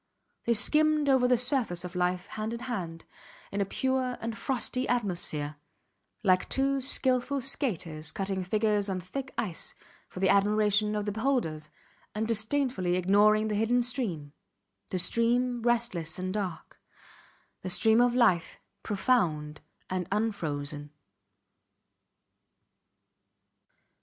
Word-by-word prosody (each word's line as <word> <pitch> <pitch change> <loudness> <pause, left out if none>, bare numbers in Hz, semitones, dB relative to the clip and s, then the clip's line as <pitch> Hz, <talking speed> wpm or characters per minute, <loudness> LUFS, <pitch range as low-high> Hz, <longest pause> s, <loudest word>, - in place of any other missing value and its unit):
They 235 - +2
skimmed 305 +4 +3
over 260 -2 +4
the 250 -1 +4
surface 245 - 0
of 180 - -7
life 180 0 0
hand 215 +1 -5
in 235 - -8
hand, 175 -10 -5 0.5
in 200 - -1
a - - +1
pure 260 +3 -1
and 230 0 -4
frosty 255 0 -1
atmosphere 175 -10 -2 0.7
like 185 -2 +2
two 275 0 +1
skilful 260 +1 +1
skaters 180 - -2
cutting 190 0 -3
figures 210 +1 0
on 185 -1 -2
thick 260 +9 -6
ice 185 -7 -3 0.3
for - - -9
the 190 - +2
admiration 210 +1 +3
of 210 -1 -2
the 205 - -1
beholders, 205 - -1 0.5
and 220 +1 -1
disdainfully 230 -4 0
ignoring 205 +4 +4
the 215 - -2
hidden 230 +4 +2
stream, 195 - -3 0.6
the 185 - -2
stream 235 +6 +2
restless 230 -9 +1
and 185 0 -3
dark; 190 -6 -5 0.8
the 185 - -5
stream 220 +5 +4
of 245 0 +3
life, 210 -9 +2 0.2
profound 170 -10 0 0.3
and 185 -2 -3
unfrozen. 150 -9 -2
210 Hz, 120 wpm, -29 LUFS, 180-245 Hz, 0.8 s, over